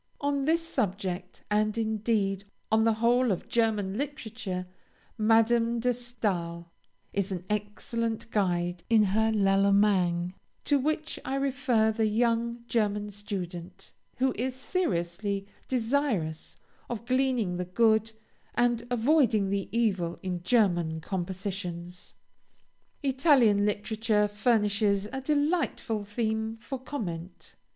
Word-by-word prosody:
On 285 Hz, -1 st, 0 dB
this 330 Hz, +2 st, +2 dB
subject, 190 Hz, -, -3 dB
and, 215 Hz, +1 st, +2 dB
indeed, 215 Hz, -3 st, 0 dB, 0.3 s
on 220 Hz, 0 st, +4 dB
the 225 Hz, -, +4 dB
whole 235 Hz, +2 st, +3 dB
of 185 Hz, -, -3 dB
German 215 Hz, -3 st, +1 dB
literature, 220 Hz, -10 st, -4 dB, 0.5 s
Madame 230 Hz, +1 st, +3 dB
de 245 Hz, +2 st, +2 dB
Stael 190 Hz, -9 st, -3 dB, 0.4 s
is 200 Hz, -1 st, -1 dB
an 180 Hz, -1 st, -4 dB
excellent 225 Hz, +2 st, -2 dB
guide 175 Hz, -3 st, 0 dB
in 225 Hz, -2 st, +6 dB
her 220 Hz, +3 st, +2 dB
"L'Allemagne," 195 Hz, -3 st, +3 dB, 0.3 s
to 290 Hz, -1 st, +3 dB
which 310 Hz, +3 st, -1 dB
I 270 Hz, -, -2 dB
refer 260 Hz, -5 st, +2 dB
the 220 Hz, 0 st, +1 dB
young 235 Hz, +1 st, 0 dB
German 210 Hz, -3 st, 0 dB
student, 185 Hz, -2 st, -6 dB, 0.3 s
who 260 Hz, 0 st, +2 dB
is 255 Hz, +1 st, -1 dB
sincerely 200 Hz, -, -2 dB, 0.2 s
desirous 230 Hz, -, -1 dB, 0.3 s
of 235 Hz, -1 st, -4 dB
gleaning 255 Hz, -7 st, +1 dB
the 180 Hz, -, -2 dB
good, 220 Hz, +3 st, +3 dB, 0.4 s
and 240 Hz, -1 st, +1 dB
avoiding 235 Hz, -5 st, +3 dB
the 200 Hz, -1 st, -1 dB
evil 195 Hz, -7 st, 0 dB
in 180 Hz, -2 st, -3 dB
German 175 Hz, -6 st, +2 dB
compositions. 180 Hz, 0 st, -5 dB, 0.9 s
Italian 260 Hz, -7 st, +4 dB
literature 210 Hz, 0 st, +1 dB
furnishes 205 Hz, -1 st, +2 dB
a 265 Hz, -, -3 dB
delightful 285 Hz, -6 st, 0 dB
theme 220 Hz, +1 st, -2 dB
for 260 Hz, +3 st, -6 dB
comment. 185 Hz, -, -6 dB
215 Hz, 110 wpm, -28 LUFS, 195-240 Hz, 0.9 s, in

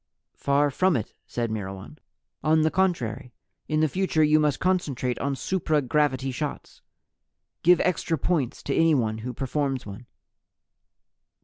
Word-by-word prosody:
"Far 145 Hz, +1 st, +2 dB
from 185 Hz, +2 st, +2 dB
it," 110 Hz, -, -5 dB
said 115 Hz, -2 st, -2 dB
Myrwan. 100 Hz, +5 st, -6 dB, 0.4 s
"On 155 Hz, +1 st, +4 dB
the 155 Hz, 0 st, +2 dB
contrary, 130 Hz, -10 st, -1 dB, 0.3 s
in 155 Hz, 0 st, +1 dB
the 155 Hz, -, +4 dB
future 180 Hz, -1 st, +1 dB
you 155 Hz, 0 st, +4 dB
must 150 Hz, -3 st, +1 dB
concentrate 145 Hz, -9 st, 0 dB
on 140 Hz, 0 st, -1 dB
supra 160 Hz, 0 st, 0 dB
gravity 135 Hz, -1 st, +1 dB
shots. 145 Hz, +3 st, -6 dB, 0.8 s
Give 180 Hz, +1 st, +5 dB
extra 170 Hz, -2 st, 0 dB
points 150 Hz, -5 st, -1 dB
to 140 Hz, -, -1 dB
anyone 125 Hz, -10 st, +2 dB
who 125 Hz, +3 st, -5 dB
performs 135 Hz, +1 st, -2 dB
one." 105 Hz, +4 st, -9 dB
145 Hz, 135 wpm, -25 LUFS, 125-160 Hz, 0.8 s, Give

